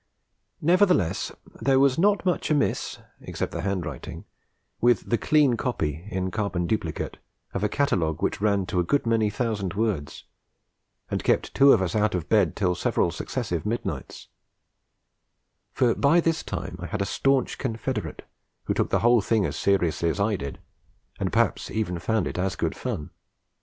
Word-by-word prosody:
Nevertheless, 180 - +3 0.3
there 135 -1 +3
was 135 +1 +3
not 205 +2 +3
much 180 -4 0
amiss 150 -2 0 0.2
(except - - -4
the - - -4
handwriting) 90 -9 -4 0.5
with 120 -2 +3
the 115 - +4
clean 150 -5 +3
copy 85 - -2
(in 95 -2 -2
carbon 100 -5 -1
duplicate) 85 -5 -2 0.4
of 100 - -2
a 105 - +2
catalogue 90 - 0
which - - -1
ran 100 -2 +2
to 90 - -1
a - - +3
good 140 +11 +1
many 115 -2 +2
thousand 105 -4 -2
words, 100 -9 -2 0.9
and - - -1
kept - - +1
two 140 +1 +7
of 95 - +4
us 90 +1 -2
out 105 -2 +2
of 85 -4 -3
bed 100 -8 +3
till 90 -3 +1
several - - 0
successive 85 -2 -3
midnights; 115 +3 -4 1.4
for 120 -2 +2
by 145 +5 +4
this 165 -1 +1
time 90 -2 -5
I 90 - -5
had 105 +2 -2
a - - -2
staunch 135 +5 +1
confederate 115 -2 -3 0.4
who - - -1
took - - 0
the - - +1
whole 120 -1 +5
thing 110 0 +1
as 75 - -3
seriously 85 -4 +1
as 90 - -2
I 105 +1 +2
did, 70 -7 -6 0.6
and - - -1
perhaps - - +1
even 95 -6 -2
found 110 +1 0
it - - -4
as 95 +1 0
good - - -2
fun. 75 - -4
105 Hz, 170 wpm, -25 LUFS, 90-125 Hz, 1.4 s, two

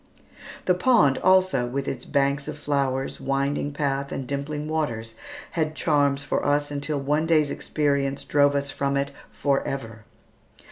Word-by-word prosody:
The 180 - +4
pond 180 - +4
also, 185 -9 +3
with 135 +2 -3
its 125 -2 -4
banks 140 0 +1
of - - -5
flowers, 135 -2 -1
winding 140 +1 -1
path, 140 -1 -2
and 135 - -4
dimpling 145 +3 -3
waters, 120 -8 -2 0.4
had 155 -2 -1
charms 145 -3 +2
for - - -1
us 145 0 +1
until 145 +1 -2
one 150 +3 0
day's 155 -3 +3
experience 140 -2 -1
drove 145 -1 +3
us 140 0 -1
from 140 0 -1
it 140 0 -1 0.2
forever. 135 -6 -2
140 Hz, 145 wpm, -25 LUFS, 135-150 Hz, 0.4 s, The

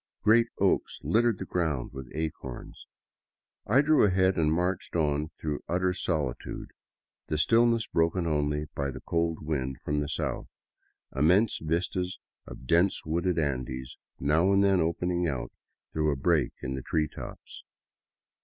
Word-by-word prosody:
Great 115 +2 +5
oaks - - +1
littered 115 -1 +2
the - - -5
ground 80 -9 -2
with 65 -2 -8
acorns. 75 -5 -6 0.8
I 130 +7 +5
drew 155 +1 +4
ahead 95 -1 +3
and 80 -2 +2
marched 90 +3 -1
on 75 -2 +1
through 75 -2 -3
utter 90 +1 +1
solitude, 80 -8 -3 0.6
the 75 - -1
stillness 115 +6 +3
broken 85 +2 +1
only 75 -1 0
by 70 -1 -2
the 70 - -7
cold 85 -2 -1
wind 65 -4 -2
from 75 0 0
the 75 -1 -2
south, 75 - -3 0.7
immense 90 +10 +3
vistas 90 +3 -1 0.3
of - - -10
dense 85 +8 +2
wooded 85 +2 0
Andes 65 -3 -2 0.2
now 80 +7 +3
and 100 0 +4
then 95 -2 +4
open 85 +2 0
ing 90 0 0
out 70 -6 -3 0.4
through 75 -1 +1
a - - 0
break 70 0 +1
in 65 - -2
the 65 - -4
tree 75 +4 0
tops. - - -10
80 Hz, 150 wpm, -28 LUFS, 75-90 Hz, 0.8 s, Great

